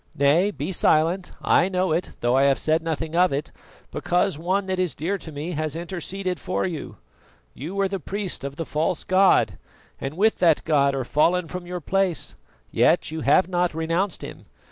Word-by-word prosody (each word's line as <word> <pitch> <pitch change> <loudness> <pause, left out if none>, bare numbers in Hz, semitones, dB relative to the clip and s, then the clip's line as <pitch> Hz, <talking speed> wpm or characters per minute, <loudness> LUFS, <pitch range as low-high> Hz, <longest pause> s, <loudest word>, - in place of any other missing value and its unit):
Nay, 150 +8 +3
be 200 - -4
silent; 170 +2 +2
I 180 - +3
know 185 -2 0
it, 165 +3 -1
though 120 +1 +2
I 135 +1 +4
have 140 -1 +3
said 160 +1 +1
nothing 160 0 -3
of 180 +1 +4
it 140 +2 -3 0.4
because 180 0 0
one 185 +6 -1
that 190 -1 -2
is 180 -3 0
dear 190 +7 -2
to 160 - -9
me 150 +4 -5
has 155 -1 -3
interceded 180 +2 -4
for 185 - -2
you. 170 -5 -5 0.6
You 160 +9 -7
were 200 0 +1
the 195 0 -4
priest 190 -2 -4
of 140 0 -5
the 165 - -4
false 155 +3 -1
god, 190 +1 +3 0.4
and 135 +4 -5
with 220 +3 +2
that 165 -4 +3
god 140 -3 +3
are 130 -2 -2
fallen 170 +6 +2
from 180 +1 -7
your 180 0 -5
place, 190 +1 -1 0.4
yet - - +2
you 160 0 -4
have 150 +6 +4
not 175 -3 0
renounced 165 +4 -1
him. - - -9
170 Hz, 190 wpm, -24 LUFS, 155-185 Hz, 0.6 s, I